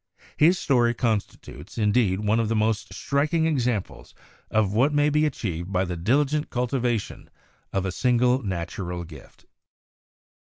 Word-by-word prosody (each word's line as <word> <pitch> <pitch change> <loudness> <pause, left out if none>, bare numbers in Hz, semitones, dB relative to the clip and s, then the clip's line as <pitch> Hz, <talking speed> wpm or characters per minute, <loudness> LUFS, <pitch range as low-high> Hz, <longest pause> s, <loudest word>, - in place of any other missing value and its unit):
His 170 +5 +4
story 120 -6 +2
constitutes, 105 - -3
indeed, 105 -3 +2
one 105 +2 +1
of 115 -2 0
the 115 - 0
most 110 0 0
striking 150 +3 0
ex 145 -7 +1
amples 115 -6 -3 0.3
of 105 -3 +1
what 130 +7 +3
may 145 +1 +3
be 150 +1 +3
achieved 90 - -4
by 95 0 +1
the 90 -1 -4
diligent 140 - +1
cultivation 125 -3 -2 0.4
of 95 -1 -1
a 95 - -1
single 125 +3 +2
natural 90 -2 -4
gift." 80 -4 -14
115 Hz, 140 wpm, -25 LUFS, 95-135 Hz, 0.4 s, His